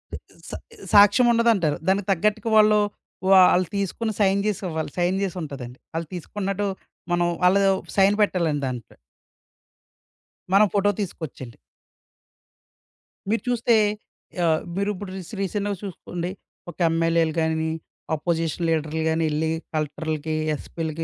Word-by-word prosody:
ఇది - - -5 0.3
సా - - -5 0.4
సాక్ష్యం 205 +4 +7
ఉండదంటారు. 220 -10 +2
దానికి 195 0 +1
తగ్గట్టుగా 210 +4 +1
వాళ్ళు 215 0 +6 0.5
వాళ్ళు 185 -1 +6
తీసుకొని 200 +3 -2
సైన్ 195 0 +3
జేసి 210 -2 -1
ఇవ్వాలి. 160 -1 -3
సైన్ 180 +2 +1
జేసి 190 -2 -2
ఉంటదండి 130 -4 -8
వాళ్ళు 165 0 -3
తీసుకున్నట్టు. 195 +3 -3 0.5
మనం 175 0 +2 0.2
వాళ్ళ 180 +2 +5 0.4
సైన్ 195 +1 +5
పెట్టాలండి 170 -8 +1
దాంట్లో. 125 -2 -7 1.6
మనం 205 +2 +6
ఫోటో 205 0 +3
తీసుకొచ్చండి. 155 - -7 1.7
మీరు 225 +2 +1
చూస్తే 240 -1 +2 0.7
ఆహ్, 160 -1 +2 0.2
మీరు 200 +1 0
ఇప్పుడు 195 0 -7
రీస్ 185 -3 -8
రీసెంట్‌గా 205 +1 -2
సూసుకోండి, 180 -2 -5 0.4
ఒక 170 - -11
ఎంఎల్ఏ‌లు 165 -1 +1
గాని, 160 0 0 0.5
అపోజిషన్ 165 +1 -1
లీడర్‌లు 160 0 -1
గానెల్లి 160 -1 0 0.2
కలెక్టర్లుకి, 155 0 -3 0.2
ఎస్‌పి‌లకి 160 +1 -5
175 Hz, 115 wpm, -24 LUFS, 160-200 Hz, 1.7 s, సాక్ష్యం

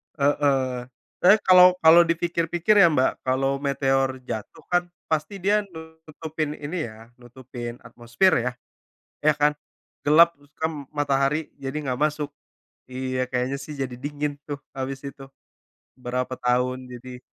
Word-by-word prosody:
Heeh. 135 -3 +1 0.3
Tapi, 185 +3 +7
kalau 180 -1 +8
kalau 160 +2 +8
dipikir-pikir, 170 +3 +1
ya, 195 -4 +8
Mbak, 130 -2 0
kalau 135 +1 +1
meteor 135 -1 0
jatuh, 110 -4 -7
kan, 175 0 +2 0.3
pasti 165 +5 -2
dia 205 +2 +2 0.4
nutupin 155 -1 -4
ini, 155 +3 -4
ya, 110 +1 -13
nutupin 120 -1 -9
atmosfer, 120 +11 +1
ya. 125 +1 -1 0.7
Ya, 155 - +6
kan? 150 0 +2 0.5
Gelap, 170 +3 +6
hitam, 145 +1 -5
matahari 145 +1 0
jadi 135 -1 -6
enggak 130 -3 -3
masuk. 150 -1 -1 0.6
Iya, 130 0 -3
kayaknya, 125 +2 -1
sih, 150 +1 -8
jadi 135 -2 -3
dingin, 145 +2 -4
tuh, 145 -1 -5 0.2
habis 135 0 -4
itu. 140 0 -8 0.7
Berapa 125 0 -3
tahun 125 +1 0
jadi 125 0 -10
140 Hz, 130 wpm, -24 LUFS, 130-155 Hz, 0.7 s, kalau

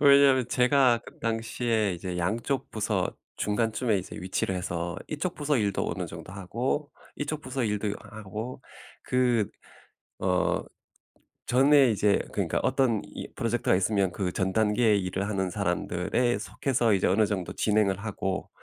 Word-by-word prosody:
왜냐하면 140 -3 +6
제가 125 -1 +4
그 - - -13
당시에 115 -2 0
이제 90 +1 -5
양쪽 115 +9 -1
부서 - - -1 0.2
중간쯤에 110 +1 +1
이제 95 - -7
위치를 95 +1 -1
해서 85 0 -3
이쪽 160 +4 -3
부서 145 -1 +1
일도 100 -3 0
어느 90 0 -3
정도 80 +2 -9
하고 120 - -2 0.3
이쪽 150 +1 -3
부서 130 0 -3
일도 105 -1 -1
하고 110 +3 -7 0.4
그 125 -5 +2 0.7
어 90 -1 +1 0.8
전에 135 0 +5
이제 105 -1 +3
그니까 - - 0
어떤 120 -6 +2
이 - - -8
프로젝트가 115 -3 +1
있으면 95 -1 +1
그 90 -2 -2
전 95 0 -1
단계의 110 0 +3
일을 95 +2 -2
하는 95 -3 -1
사람들에 90 +5 0
속해서 120 -5 0
이제 95 - +3
어느 105 +3 +3
정도 95 -4 -3
진행을 105 -3 +2
하고 95 -3 -3
110 Hz, 305 characters per minute, -27 LUFS, 95-125 Hz, 0.8 s, 왜냐하면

